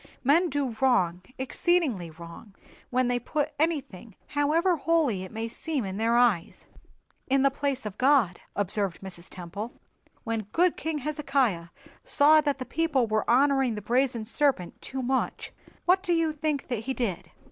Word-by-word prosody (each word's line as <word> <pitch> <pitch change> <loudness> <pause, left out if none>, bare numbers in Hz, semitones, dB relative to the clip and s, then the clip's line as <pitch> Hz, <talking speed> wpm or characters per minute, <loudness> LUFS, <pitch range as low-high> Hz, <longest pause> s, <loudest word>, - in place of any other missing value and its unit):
"Men 325 +7 +4
do 270 -4 -2
wrong, 185 -10 +2 0.2
exceedingly 265 - 0
wrong, 170 +5 -12 0.3
when 255 0 +1
they 245 0 +1
put 295 +3 -2
anything, 270 - -2
however 320 +5 +2
holy 305 - +1
it 185 - -9
may 225 +1 -4
seem 275 +1 -3
in 190 0 -5
their 225 +2 +1
eyes, 235 -8 +2 0.6
in 270 0 +3
the 275 - +4
place 275 -3 -2
of 210 -1 -6
God," 255 -10 +3
observed 200 -2 0
Mrs. 185 -2 -8
Temple. 190 +6 -7 0.5
"When 225 -3 -3
good 355 +1 +3
king 320 -1 -3
Hezekiah 275 - 0 0.4
saw 305 +2 +5
that 285 -2 -1
his 255 - -6
people 320 -7 +1
were 215 -1 -1
honoring 270 -1 +3
the 210 - -5
brazen 240 0 +1
serpent 235 -7 0
too 265 -1 -5
much, 260 +1 -1 0.3
what 370 +1 +4
do 355 -3 0
you 330 -2 +2
think 300 -2 -2
that 245 -4 -1
he 265 0 -2
did?" 210 -9 -3
260 Hz, 160 wpm, -27 LUFS, 215-290 Hz, 0.6 s, saw